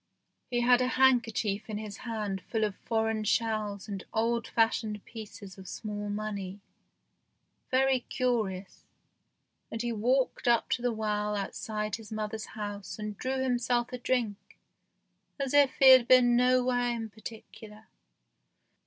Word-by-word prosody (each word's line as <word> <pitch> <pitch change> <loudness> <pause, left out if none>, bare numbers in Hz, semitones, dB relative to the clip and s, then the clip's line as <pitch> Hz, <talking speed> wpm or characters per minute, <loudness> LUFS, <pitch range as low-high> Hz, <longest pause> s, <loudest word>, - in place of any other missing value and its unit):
He 240 -1 0
had 245 +1 +5
a 250 - +2
handkerchief 235 -6 +2
in 210 - -3
his 210 -1 -7
hand 210 -5 -4
full 225 -2 0
of 205 -2 -1
foreign 220 -1 -1
shells 215 -2 -1
and 195 -2 -5
old 230 +1 +1
fashioned 220 -2 0
pieces 205 -4 -10
of 190 - -11
small 205 -1 -5
money, 205 -2 -4 1.1
very 265 0 +3
curious, 220 -7 -2 0.8
and 225 +1 -4
he 240 - -1
walked 250 +4 0
up 235 -1 +3
to 245 - +1
the 245 0 +1
well 210 -1 -1
outside 210 +1 -3
his 225 -2 -13
mother's 215 0 -4
house 205 -3 -5
and 210 -1 -5
drew 260 +4 -2
himself 245 -1 0
a 250 - -4
drink 220 -6 -2 0.8
as 275 -1 -2
if 285 -2 +5
he 265 -1 +8
had 255 -2 +7
been 245 -1 +6
nowhere 250 0 +3
in 225 -1 -4
particular. 220 0 -11
220 Hz, 140 wpm, -29 LUFS, 210-245 Hz, 1.1 s, he